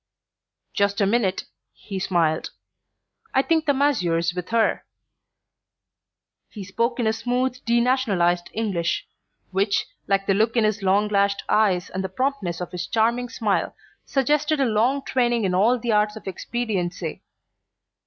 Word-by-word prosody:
"Just 200 -1 +1
a 200 - +3
minute," 195 -3 +1 0.3
he 195 -2 -7
smiled; 165 -4 0 0.9
"I 265 - +4
think 320 0 +1
the - - +5
masseur's 180 -12 +1
with 180 0 -5
her." 230 -1 +1 1.7
He 205 - -8
spoke 230 +6 -1
in 235 - +1
a 220 - +2
smooth 250 +3 -2
denationalized 235 -8 +2
English, 195 -7 -2 0.4
which, 200 +2 +1 0.2
like 195 0 +1
the 195 - +2
look 220 +4 +1
in 230 - +4
his 215 -1 0
long 195 +2 +2
lashed 200 -1 +1
eyes 195 -5 +2
and 190 +1 -3
the 190 - -3
promptness 200 -6 -2
of 180 - -5
his 180 - -4
charming 235 +2 +1
smile, 215 -4 -1 0.3
suggested 295 +2 +1
a 270 - +3
long 245 +5 +1
training 240 -3 +1
in 185 - 0
all 220 +7 +3
the 235 -1 -2
arts 210 0 +2
of 220 - -10
expediency. 190 -5 -3
215 Hz, 145 wpm, -23 LUFS, 190-245 Hz, 1.7 s, the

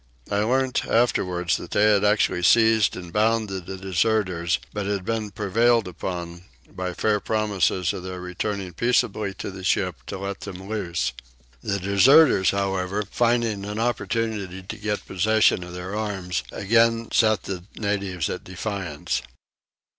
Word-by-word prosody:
I 100 - +1
learnt 130 +4 +1
afterwards 90 -7 +1
that - - -9
they 105 - +2
had 100 - +2
actually 105 -3 +2
seized 110 +3 +4
and 90 -2 -9
bound 110 0 +2
the 95 0 -5
deserters 95 -2 0 0.2
but 105 -1 -3
had 100 -2 -2
been 110 -1 -2
prevailed 110 +3 +2
upon, 85 -1 -6 0.2
by 90 -1 -5
fair 105 +1 +1
promises 100 -4 0
of - - -5
their 90 0 -6
returning 90 +1 -4
peaceably 110 -1 0
to - - -6
the 95 0 -9
ship, 90 -3 +1
to - - -5
let 100 +1 -5
them 95 -1 -8
loose: 85 - -2 0.5
the 100 -1 -1
deserters 100 - +5
however, 100 0 -1
finding 115 -4 +1
an 105 +1 -5
opportunity 110 -4 -2
to 95 - -7
get 105 0 -3
possession 105 0 +2
of 90 0 -9
their 90 +3 -5
arms, 95 -5 -2
again 115 +2 +2
set 110 -4 +3
the 90 -2 -6
natives 100 -5 -2
at - - -5
defiance. 90 -4 -3
100 Hz, 145 wpm, -24 LUFS, 90-110 Hz, 0.5 s, deserters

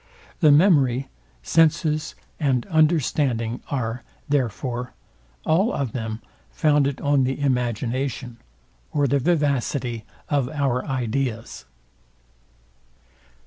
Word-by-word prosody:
The 155 -4 +6
memory, 140 -6 +4 0.3
senses, 155 -1 +2 0.2
and 135 -6 +1
understanding 145 -7 +1
are, 120 -3 -2 0.3
therefore, 125 -2 -2 0.5
all 185 +8 +3
of 135 -5 -2
them 110 -2 -5 0.3
founded 145 -2 +2
on 145 -2 +3
the 130 +2 -1
imagination, 125 -1 -1 0.5
or 145 -1 +1
the 140 +2 +2
vivacity 140 -6 0 0.2
of 140 -4 0
our 135 -4 0
ideas. 125 -3 -3
135 Hz, 90 wpm, -23 LUFS, 120-150 Hz, 0.5 s, The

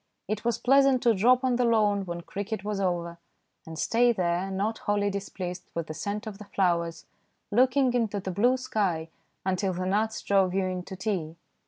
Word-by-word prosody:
It 215 +2 -3
was 235 0 +1
pleasant 270 0 +4
to 235 -2 +5
drop 245 +6 +4
on 255 -2 +2
the 250 - +2
lawn 210 -4 +2
when 170 0 -4
cricket 200 +3 -5
was 205 -1 -2
over, 170 -3 -2 0.5
and 160 0 -7
stay 240 +7 +3
there, 180 -2 0
not 200 +4 -2
wholly 205 -1 0
displeased 185 -2 -5
with 170 -1 -2
the 155 - -6
scent 205 +7 -4
of 210 -2 -7
the 210 - -9
flowers, 170 -4 0 0.5
looking 255 +3 +3
into 225 -4 0
the 190 0 -4
blue 240 +8 +3
sky 190 -10 -1 0.4
until 190 0 0
the 185 +1 -3
gnats 215 +4 0
drove 190 -2 +2
you 195 -1 +1
in 185 -1 -2
to 190 - -7
tea. 185 -5 -3
200 Hz, 190 wpm, -27 LUFS, 180-225 Hz, 0.5 s, to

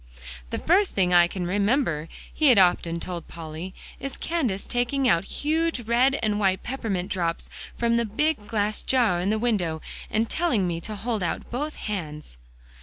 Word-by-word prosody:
"The - - -2
first 380 +4 +2
thing 180 -2 +2
I 175 -1 +7
can 180 0 -4
remember," 200 - +1 0.2
he 310 - +3
had 250 -5 +7
often 175 -2 +3
told 175 -1 -6
Polly, 165 +2 -7 0.2
"is 275 - -5
Candace 260 - -1
taking 250 +2 0
out 170 -5 +3
huge 320 +1 -1
red 245 +4 +3
and 210 -1 +1
white 190 -2 +1
peppermint 210 -8 -3
drops, 170 -3 -2 0.3
from 235 0 +2
the 235 - +1
big 250 +1 0
glass 210 -1 0
jar 235 -9 +2
in 185 - 0
the 215 - +2
window, 200 -9 0 0.3
and 220 +1 +1
telling 245 - +1
me 170 -1 -2
to 215 +5 -5
hold 220 0 -2
out 170 -2 -3
both 295 +5 -3
hands." 150 - -5
210 Hz, 175 wpm, -25 LUFS, 180-250 Hz, 0.3 s, I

